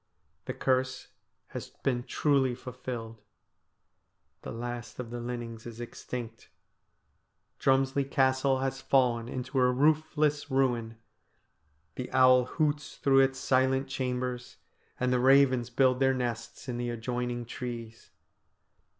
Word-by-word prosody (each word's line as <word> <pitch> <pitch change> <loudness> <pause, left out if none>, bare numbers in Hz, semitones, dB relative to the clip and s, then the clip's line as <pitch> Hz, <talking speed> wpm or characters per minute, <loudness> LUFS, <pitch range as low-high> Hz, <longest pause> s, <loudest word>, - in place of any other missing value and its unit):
The - - -4
curse 130 0 0 0.4
has - - -7
been 125 -3 +1
truly 130 0 +1
fulfilled. 120 -3 -7 1.2
The - - -7
last 120 +1 -6
of 120 -2 -6
the 120 - -4
Linnings 120 -1 -6
is 115 -1 -9
extinct. 120 -1 -7 1.1
Drumslie 135 +1 +2
Castle 130 0 +2
has 135 0 -2
fallen 120 -4 +2
into 130 +2 -2
a 125 0 +4
roofless 150 +1 +2
ruin, 120 -4 0 1.0
the 125 - -6
owl 130 -1 +6
hoots 145 +1 -1
through 135 -1 +3
its 135 0 +3
silent 130 +1 +2
chambers, 125 -2 -3 0.4
and 125 0 +1
the 125 - +2
ravens 130 -2 +4
build 130 +1 +3
their 135 -1 +3
nests 120 -1 -4
in 125 -2 -3
the 120 0 -2
adjoining 120 +1 -3
trees. 115 -1 -7
125 Hz, 120 wpm, -29 LUFS, 120-135 Hz, 1.2 s, owl